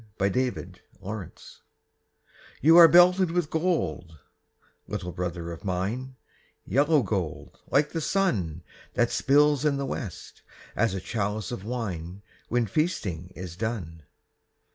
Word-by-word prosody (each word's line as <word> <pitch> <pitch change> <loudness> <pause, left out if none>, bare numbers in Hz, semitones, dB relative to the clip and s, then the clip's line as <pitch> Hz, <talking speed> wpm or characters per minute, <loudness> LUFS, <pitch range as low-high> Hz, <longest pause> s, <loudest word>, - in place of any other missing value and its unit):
THE 100 +1 +1
HOMING 100 -5 -4
BEE - - -20 1.2
You 160 +3 +6
are 170 -1 +11
belted 180 +2 +6
with 170 -2 -1
gold, 95 - -1 0.7
little 90 - -4
brother 85 -1 -4
of 85 - -9
mine, 105 +8 -3 0.5
Yellow 145 +1 +3
gold, 95 -7 -4
like 150 +1 +2
the 165 - -3
sun 100 - 0 0.3
That - - +2
spills 145 0 +3
in 145 -2 +2
the 140 - -2
west, 105 -8 -7 0.3
as 115 -3 +1
a 95 - -4
chalice 105 0 -3
of 120 -6 -5
wine 100 -6 -5 0.3
When 120 0 +1
feasting 100 - -2
is 90 -2 -7
done. 95 -7 -4
110 Hz, 125 wpm, -26 LUFS, 90-145 Hz, 1.2 s, are